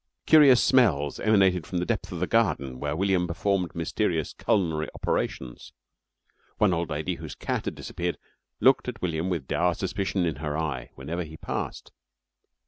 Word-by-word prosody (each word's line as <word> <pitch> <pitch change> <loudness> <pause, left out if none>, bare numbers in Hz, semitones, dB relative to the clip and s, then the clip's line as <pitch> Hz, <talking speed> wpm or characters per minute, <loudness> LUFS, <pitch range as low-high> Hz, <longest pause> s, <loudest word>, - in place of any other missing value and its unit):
Curious 140 -6 +7
smells 80 - +3
emanated 95 -6 +3
from 90 - -3
the 90 - 0
depth 100 -3 -2
of 90 - -5
the 90 - +1
garden 70 - 0
where 75 +1 -2
William 95 0 +1
performed 90 +1 -1
mysterious 85 -1 -1
culinary 80 -6 0
operations. 60 -2 -3 0.8
One 105 -4 +3
old 85 -1 -1
lady 75 0 -2
whose - - -8
cat - - -3
had - - -3
disappeared 90 -1 -4 0.4
looked 130 -1 +4
at 120 -5 -6
William 85 0 -1
with 85 -7 -2
dour 85 +5 +1
suspicion 95 -1 -1
in 80 -5 -2
her 75 0 -3
eye 75 -6 -3
whenever 80 +7 -4
he 80 -1 -10
passed. - - -5
90 Hz, 160 wpm, -26 LUFS, 80-100 Hz, 0.8 s, Curious